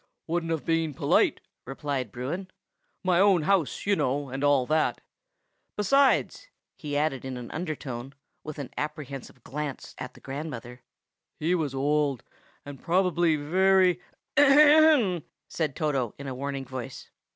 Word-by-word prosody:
"Wouldn't 165 0 -2
have 160 -2 -2
been 165 -3 0
polite!" - - +2 0.2
replied 135 -3 -4
Bruin. 145 - -4 0.6
"My 180 -2 +3
own 195 -4 +4
house, 185 -3 +1
you 200 0 +3
know, 140 -3 -1
and 135 +2 -4
all 145 -3 +4
that. 155 +3 +1 0.8
Besides," 275 - +2 0.3
he 145 -2 -4
added 145 -4 0
in 130 -1 -5
an 120 -1 -8
undertone, 140 -6 -5 0.3
with 155 -1 -7
an 140 -4 -6
apprehensive 145 -3 -6
glance 145 0 -5
at 130 - -7
the - - -14
grandmother, 135 -3 -7 0.6
"he 165 +3 +1
was 155 -6 -1
old, 145 -2 +1 0.4
and 140 -2 -9
probably 175 -2 +2
very—" 185 +4 +3 0.4
"Ahem!" 290 - +6 0.3
said 155 -5 -2
Toto 135 -7 -1
in 140 - -8
a 135 - -4
warning 135 +1 -4
voice. 130 0 -8
150 Hz, 140 wpm, -27 LUFS, 135-175 Hz, 0.8 s, Ahem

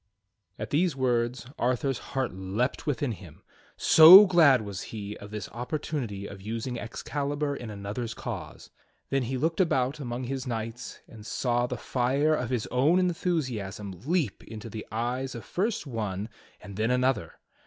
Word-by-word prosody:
At 110 - -6
these 165 +2 +2
words 125 -1 0
Arthur's 125 +1 0
heart 130 -5 -3
leaped 95 - -2
within 145 -2 0
him, 90 -7 -11 0.3
so 180 +6 +10
glad 155 - +5
was 100 -2 -6
he 105 -1 -6
of 100 - -10
this 105 -2 -5
opportunity 120 -5 -4
of 100 -1 -9
using 115 +4 -4
Excalibur 145 +4 -3
in 120 -4 -7
another's 105 +3 -5
cause. - - -7 0.4
Then 135 0 +2
he 130 +2 -2
looked 160 +6 +1
about 140 -5 +1
among 125 -2 -4
his 130 +1 -4
knights 115 0 -5
and 110 -2 -12
saw 120 +2 0
the - - -4
fire 135 +5 +1
of 125 -6 -1
his 125 -4 -1
own 140 +8 +3
enthusiasm 130 - -1
leap 155 - -1
into 110 0 -9
the 110 -1 -7
eyes 125 +4 -2
of 115 - -8
first 205 0 -1
one 105 -5 -4 0.3
and 100 -1 -10
then 110 +2 +1
another. 125 -7 +1
125 Hz, 155 wpm, -28 LUFS, 110-140 Hz, 0.4 s, so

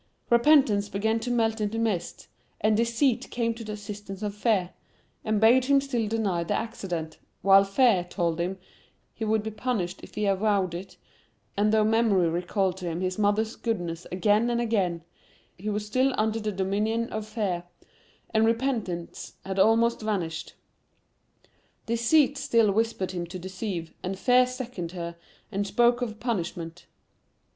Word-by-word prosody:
Repentance 235 -5 +4
began 220 +3 0
to 235 +2 -4
melt 225 -2 +1
into 210 +2 -1
mist, 220 -6 -2 0.3
and 215 +1 +3
Deceit 235 +3 +1
came 230 -1 -1
to 230 0 -9
the 215 -1 -5
assistance 205 -1 -7
of 205 -1 -2
Fear, 205 -4 +1 0.5
and 215 -1 0
bade 240 +4 +5
him 280 +1 +4
still 250 -5 -1
deny 205 -6 0
the 165 - -1
accident, 175 -8 -4 0.2
while 195 0 +7
Fear 195 -2 +3
told 170 -3 -1
him[Pg 170 - +1
12] - - -23 0.6
he 220 - -4
would 215 0 +1
he 220 - -3
punished, 210 -5 -2
if - - -13
he 210 - -1
avowed 195 -2 +1
it,—and 200 +3 -5
though 215 -1 +4
Memory 215 -5 +3
recalled 180 +2 -1
to 180 -2 -5
him 170 +1 -3
his 185 +1 -2
mother's 215 +2 +1
goodness 175 -7 -3
again 210 +5 +2
and 235 0 0
again, 195 -8 0 0.5
he 205 +4 -5
was 210 0 -2
still 255 +5 +1
under 220 +1 +1
the 215 -1 -2
dominion 210 +4 0
of 215 -1 -5
Fear, 200 -6 -2 0.7
and 220 0 +4
Repentance 225 -7 -1
had 190 0 -3
almost 225 +3 +4
vanished. 185 -7 -3 1.3
Deceit 265 +5 +3
still 230 -7 +3
whispered 220 -2 0
him 175 -2 -4
to 180 +2 -7
deceive, 185 -2 -5
and 190 +1 -4
Fear 250 +4 +4
seconded 245 -9 -6
her, 170 0 -5 0.4
and 200 0 -1
spoke 240 +3 +3
of 220 -3 -4
punishment. 175 -7 -4
210 Hz, 155 wpm, -27 LUFS, 185-230 Hz, 1.3 s, while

